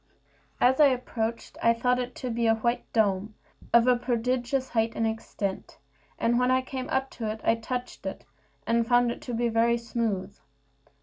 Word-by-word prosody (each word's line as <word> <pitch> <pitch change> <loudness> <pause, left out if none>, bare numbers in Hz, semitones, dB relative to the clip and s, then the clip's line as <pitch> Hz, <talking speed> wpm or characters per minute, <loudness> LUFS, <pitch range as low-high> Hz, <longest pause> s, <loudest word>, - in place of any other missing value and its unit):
As 260 +3 +4
I 300 - +8
approached, 235 -3 -3
I 230 0 +4
thought 250 +2 +1
it 250 0 -4
to 255 -2 -4
be 230 0 0
a 225 - +4
white 235 +2 -2
dome, 210 -1 +1 0.4
of 235 0 +6
a 250 0 +5
prodigious 250 +2 -1
height 225 -1 0
and 225 - 0
extent; 220 -3 -4 0.4
and 240 +1 +2
when 250 0 +2
I 260 0 +3
came 260 0 -5
up 265 0 -1
to 225 -3 -4
it, 220 - -6
I - - +4
touched 245 +2 -5
it, - - -6 0.4
and 230 0 +1
found 245 0 +4
it - - -7
to 245 - -6
be 240 +1 +1
very 230 +1 +2
smooth. 220 -5 -2
235 Hz, 185 wpm, -27 LUFS, 225-250 Hz, 0.4 s, I